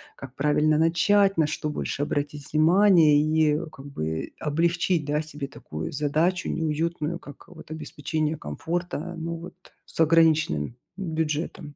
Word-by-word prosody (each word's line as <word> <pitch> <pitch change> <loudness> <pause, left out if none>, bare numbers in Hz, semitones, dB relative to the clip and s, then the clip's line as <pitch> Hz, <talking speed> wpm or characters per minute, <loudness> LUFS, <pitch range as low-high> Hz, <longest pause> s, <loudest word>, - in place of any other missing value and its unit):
Как 135 -1 -10
правильно 150 +2 +2
начать, 195 +4 +3
на 160 - +4
что 150 0 -3
больше 145 - -3
обратить 145 0 -3
внимание? 160 -2 +5
И, 155 -1 +2
как 135 - -12
бы, 80 - -4
облегчить, 170 +1 +1
да, 150 +1 0
себе 150 -2 -6
такую 80 - -7
задачу 155 +6 0
неуютную, 165 +1 -2
как, 145 -1 -13
вот, 160 -3 -13
обеспечение 155 0 -3
комфорта, 170 - -4
но, 165 0 -4
вот, 170 +2 -9 0.3
с - - -12
ограниченным 160 - +3 0.2
бюджетом. 160 -4 -3
155 Hz, 135 wpm, -25 LUFS, 145-165 Hz, 0.3 s, внимание